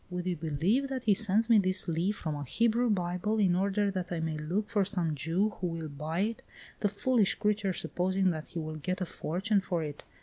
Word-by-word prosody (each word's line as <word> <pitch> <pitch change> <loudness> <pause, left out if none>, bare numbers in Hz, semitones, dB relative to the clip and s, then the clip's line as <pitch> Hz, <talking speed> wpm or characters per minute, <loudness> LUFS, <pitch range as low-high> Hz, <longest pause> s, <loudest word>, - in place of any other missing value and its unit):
Would 180 -1 -4
you 180 -1 0
believe 165 - 0
that 260 -2 -3
he 215 -4 +4
sends 220 +2 +2
me 230 -3 +6
this 185 -1 +2
leaf 170 +5 0
from 155 -5 -3
a 145 -1 -4
Hebrew 235 - +1
Bible, 180 +2 0
in 190 -4 +3
order 200 +2 +1
that 185 -2 -4
I 170 - -1
may 160 -1 -2
look 175 +8 -2
for 205 -2 +2
some 180 -5 0
Jew 165 +9 0
who 180 - 0
will 165 -2 -4
buy 155 +5 -3
it, 220 +3 -1 0.4
the 205 - +1
foolish 215 0 +2
creature 210 -2 0
supposing 185 +1 0
that 155 -2 -5
he - - -9
will 155 -1 -4
get 185 +5 -3
a - - +1
fortune 195 +6 0
for 175 -4 -2
it. 145 -1 -6
185 Hz, 225 wpm, -30 LUFS, 165-210 Hz, 0.4 s, me